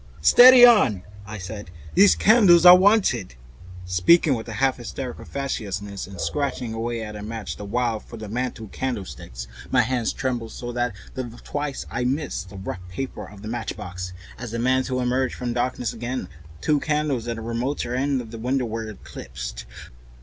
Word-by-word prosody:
"Steady 245 - +9
on!" 135 - +5 0.2
I 110 +1 -6
said, 100 0 -7 0.3
"those 200 0 +7
candles 195 -6 +6
are 180 0 +12
wanted," 185 - +3 0.5
speaking 90 - +4
with 115 -2 -4
a - - -5
half 130 +4 +1
hysterical 125 +1 -7
facetiousness, 100 -8 -4
and 95 -2 -11
scratching 125 - -2
away 115 0 -3
at 105 -1 -7
a 105 - -7
match 110 0 -5
the 105 - -8
while, 115 +1 -1
"for 115 - -12
the 110 -1 -7
mantel 120 +1 -3
candlesticks." 80 - -5 0.2
My - - +4
hands 125 -3 0
trembled 120 -4 -3
so 120 0 -6
much 120 -3 -1 0.2
that 120 -2 -7
twice 145 -1 -4
I - - -2
missed 130 - -2
the 100 - -10
rough 95 -1 -5
paper 130 +9 -6
of 105 -1 -13
the - - -6
matchbox. 90 -6 -5 0.3
As 120 0 -6
the 115 - -4
mantel 130 +1 +1
emerged 125 +1 0
from 120 -1 -3
darkness 125 -1 -1
again, 120 -3 -4 0.3
two 150 -1 +2
candles 150 -6 -1
in 120 - -2
the 115 - -7
remoter 120 +2 -2
end 135 +1 0
of 115 -2 -11
the 115 - -8
room 125 +4 0
were 115 -3 -3
eclipsed. - - -8
120 Hz, 175 wpm, -23 LUFS, 105-130 Hz, 0.5 s, are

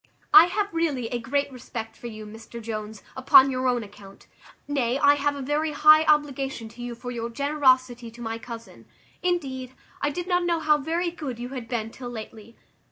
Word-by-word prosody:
I 395 -4 +11
have 400 +2 -2
really 290 -8 -1
a 245 - -2
great 280 +4 -1
respect 225 -3 -7
for 240 - -9
you, 215 -2 -8
Mr 225 +2 -10
Jones, 215 -2 -6
upon 265 +1 +6
your 255 0 -1
own 245 -2 +1
account; 200 -1 -14 0.4
nay, 265 -3 0
I 285 0 +5
have 290 0 0
a 280 - -5
very 300 +3 -1
high 310 +1 +6
obligation 275 -5 0
to 230 +2 -13
you 240 0 -5
for 245 +1 -7
your 235 -1 -4
generosity 255 -3 +1
to 235 +1 -16
my 225 -1 -4
cousin. 230 -1 -10 0.3
Indeed, 265 -8 -2 0.3
I 290 - +1
did 350 +5 -5
not 355 -1 +2
know 340 -1 +1
how 305 -1 +3
very 335 +4 -1
good 295 -8 -6
you 245 +1 -6
had 255 -3 -7
been 225 -2 -3
till 245 0 -8
lately. 220 -1 -9
260 Hz, 195 wpm, -25 LUFS, 230-295 Hz, 0.4 s, I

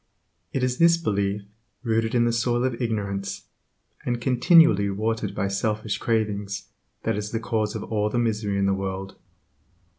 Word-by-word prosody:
It 135 - -1
is 125 0 0
this 170 0 +6
belief, 100 -8 -1 0.4
rooted 115 -1 0
in 120 -1 +4
the 120 - +2
soil 120 +1 +1
of 130 -1 -1
ignorance, 100 -4 -2 0.6
and 120 -1 -1
continually 125 - +5
watered 110 +3 -2
by 100 - 0
selfish 105 +2 -1
cravings, 105 -3 -1 0.3
that - - 0
is 105 0 -3
the 115 - -2
cause 110 -2 -1
of - - -4
all 105 -1 0
the 120 - -2
misery 105 -4 0
in 100 - +2
the 100 - +3
world. 95 0 -4
110 Hz, 160 wpm, -25 LUFS, 100-120 Hz, 0.6 s, this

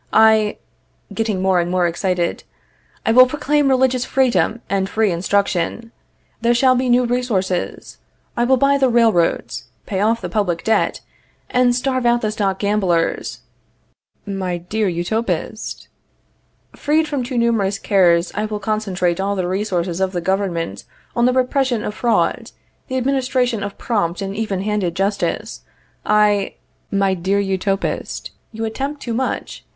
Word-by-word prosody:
I 220 -1 +4 0.6
Getting 215 -4 -1
more 190 -1 +3
and 175 0 -1
more 180 -1 +2
excited: 175 0 -1 0.6
I - - +3
will 255 +2 +8
proclaim 295 +1 +1
religious 260 -1 +2
freedom 235 -5 +1
and 195 -1 -1
free 220 -2 +1
instruction. 195 +4 -1 0.5
There 235 +1 +3
shall 255 +1 +4
be 255 0 0
new 245 +1 +4
resources. 225 -7 -2 0.4
I 240 - +1
will 260 +1 +4
buy 275 +2 +3
the 265 -1 +3
railroads, 225 -8 +2 0.2
pay 190 - -3
off 225 +3 +2
the - - -5
public 180 -6 -1
debt, 220 0 +1 0.5
and 250 -1 +3
starve 255 -1 0
out 240 0 +3
the 215 - -1
stock 200 -3 -1
gamblers. 195 -5 0 0.8
My 190 -3 -3
dear 205 +5 -2
Utopist! 180 +7 -3 0.9
Freed 310 +2 +1
from 285 -3 -2
too 250 0 -4
numerous 220 -4 +1
cares, 175 -5 +3
I 210 - -1
will 210 -1 -4
concentrate 195 -4 -1
all 200 +1 0
the 185 -2 -1
resources 185 -2 -1
of 190 0 0
the 175 - -1
government 175 - -2 0.3
on 240 +1 +3
the 250 - +2
repression 255 -2 +1
of 210 - -3
fraud, 235 +1 0 0.4
the 260 - -2
administration 255 -3 0
of 200 0 -5
prompt 190 -7 -1
and 195 0 -4
even 205 -3 -2
handed 205 -5 -1
justice. 200 +1 -2 0.4
I 210 -1 +2 0.3
My 195 -1 +1
dear 190 +3 0
Utopist, 195 0 -2 0.2
you 225 0 -4
attempt 275 +6 -4
too 235 - -3
much. 260 +3 -3
210 Hz, 145 wpm, -19 LUFS, 190-240 Hz, 0.9 s, will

